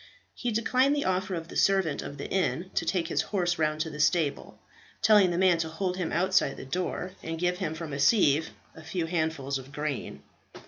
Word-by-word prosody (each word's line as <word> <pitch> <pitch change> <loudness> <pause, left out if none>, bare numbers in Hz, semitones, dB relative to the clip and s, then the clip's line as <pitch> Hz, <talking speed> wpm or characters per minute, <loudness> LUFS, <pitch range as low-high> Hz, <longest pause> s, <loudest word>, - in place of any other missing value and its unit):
He 245 - -3
declined 255 +5 +2
the 285 - -1
offer 185 +1 0
of 165 -1 -5
the - - -11
servant 190 -7 +2
of 140 - -7
the 140 - -5
inn 185 -1 -1
to - - 0
take 175 -4 0
his - - +1
horse 175 -4 -1
round 155 0 +1
to 160 - -2
the 150 - -8
stable, 155 -2 +1 0.5
telling 210 -4 +6
the 170 - -1
man 180 -2 +4
to 160 -1 -1
hold 180 +3 -2
him 180 -3 -2
outside 185 -4 +2
the - - -8
door 180 +4 -3
and 165 0 -4
give 180 +1 0
him 160 -5 -2
from 160 -3 -6
a 140 - -3
sieve 155 -3 +4 0.3
a 160 - -11
few 170 +1 -3
handfuls 160 -5 -1
of 130 +1 -12
grain. 150 -2 -4
170 Hz, 215 wpm, -28 LUFS, 155-190 Hz, 0.5 s, telling